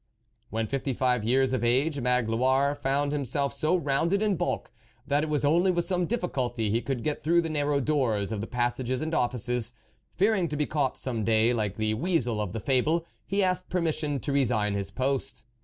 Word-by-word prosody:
When 110 0 -1
fifty 135 +2 -2
five 125 -2 +1
years 130 +3 +2
of 130 - -1
age, 135 +5 +2
Magloire 125 +3 +2
found 145 0 0
himself 140 -1 -1
so 155 +5 +1
rounded 170 +5 +1
in 210 -2 +2
bulk, 175 +1 -2 0.3
that 145 +1 +1
it 155 - -3
was 150 -1 0
only 170 +6 +3
with 175 -1 +1
some 180 -2 0
difficulty 125 - -1
he 115 +2 +1
could 130 -3 -3
get 150 - -2
through 170 +3 +3
the 165 - -3
narrow 145 -1 +1
doors 125 -8 0
of 105 -2 -3
the 110 - -5
passages 125 +1 -1
and 160 +1 -3
offices. 125 -2 0 0.4
Fearing 195 -1 +2
to 150 - -4
be 150 - +1
caught 145 -4 -1
some 120 -4 -3
day 115 +2 +3
like 105 -4 -2
the 110 0 0
weasel 125 -5 0
of 105 -4 -3
the 115 - -4
fable, 150 +8 +1 0.2
he 200 +1 +1
asked 185 0 0
permission 155 -5 -1
to 140 - -2
resign 115 -7 +1
his 100 -1 -2
post. 135 -3 -2
135 Hz, 195 wpm, -27 LUFS, 120-155 Hz, 0.4 s, only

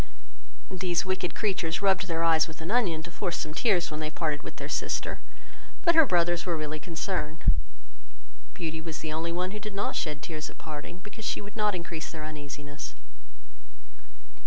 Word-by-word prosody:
These 180 -1 +1
wicked 185 -1 0
creatures 190 -4 +1
rubbed 190 -1 +4
their 165 -1 +1
eyes 160 -1 +6
with 160 -1 -9
an 165 +4 -3
onion, 185 -10 +3
to 175 - -7
force 175 -1 -1
some 155 - -3
tears 180 -2 +3
when 155 - -3
they 155 -1 -1
parted 155 -2 0
with - - -7
their - - -5
sister; - - 0 0.7
but 340 - +7
her 320 -3 +8
brothers 175 -2 +4
were 175 -3 0
really 155 0 -2
concerned. 165 -1 -2 1.1
Beauty 160 -1 -2
was 160 -1 -4
the 155 -1 -2
only 165 +2 0
one 180 +2 0
who 210 - -4
did 210 -1 -6
not 200 - 0
shed 150 -2 -1
tears 155 -1 -3
at - - -13
parting, 155 +3 -6
because 220 +2 -9
she - - +1
would 205 0 -8
not 210 -3 +3
increase 170 -2 -4
their 155 -2 -6
uneasiness. 145 -1 -6
170 Hz, 185 wpm, -30 LUFS, 155-190 Hz, 1.1 s, her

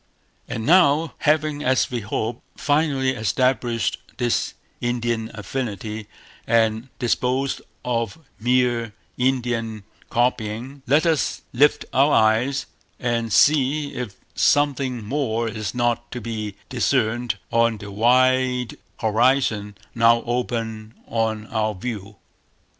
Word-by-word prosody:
And 110 - -4
now, 160 -2 +4
having, 150 -1 +1
as 130 0 +2
we 120 - -1
hope, 110 +2 -3 0.2
finally 145 -3 +1
established 120 -2 0 0.2
this 120 -2 0 0.2
Indian 120 -2 -1
affinity, 105 -1 -4 0.4
and 115 +1 +2
disposed 130 +2 0 0.2
of 115 +3 -1 0.2
mere 120 -1 +1 0.3
Indian 120 -4 0 0.3
copying, 120 +2 -1
let 145 +6 +4
us 160 -4 +1
lift 145 +4 +3
our 140 +3 +4
eyes 115 +6 +3 0.3
and 115 -2 -1
see 145 +3 +3
if 120 -6 -5 0.2
something 135 -5 +1
more 115 -2 -1
is 110 -1 -4
not 120 -1 0
to 125 - -4
be 110 -3 -5
discerned 120 -3 0
on 115 -1 +3
the 100 -1 -9
wide 125 +2 +2 0.2
horizon 110 -2 +2 0.2
now 115 0 +4
open 115 -2 -3
on 110 -1 -1
our 110 0 -1
view. 105 0 -6
120 Hz, 110 wpm, -23 LUFS, 110-130 Hz, 0.4 s, now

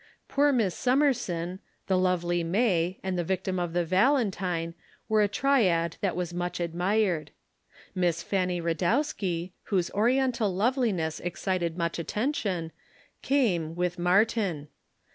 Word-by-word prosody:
Poor 290 +1 +3
Miss 220 -9 +1
Summerson, 205 - 0 0.3
the 190 - +1
lovely 175 -2 +1
May, 185 -1 +1
and 185 -1 -2
the - - +1
victim 185 +1 -2
of 175 -2 -2
the 175 0 +1
Valentine 185 - +1 0.3
were 215 -1 +3
a 205 - +4
triad 195 - +2
that 190 -5 0
was 175 -1 -3
much 175 0 -3
admired. 175 -1 0 0.6
Miss 175 -3 0
Fanny 180 -2 0
Radowski, 175 - -1
whose 185 -4 0
Oriental 235 0 +2
loveliness 205 - 0
excited 175 -1 -2
much 170 0 -1
attention, 195 - -2 0.5
came, 180 - +1
with 180 0 -1
Martin. 180 -4 +1
185 Hz, 125 wpm, -28 LUFS, 170-215 Hz, 0.6 s, a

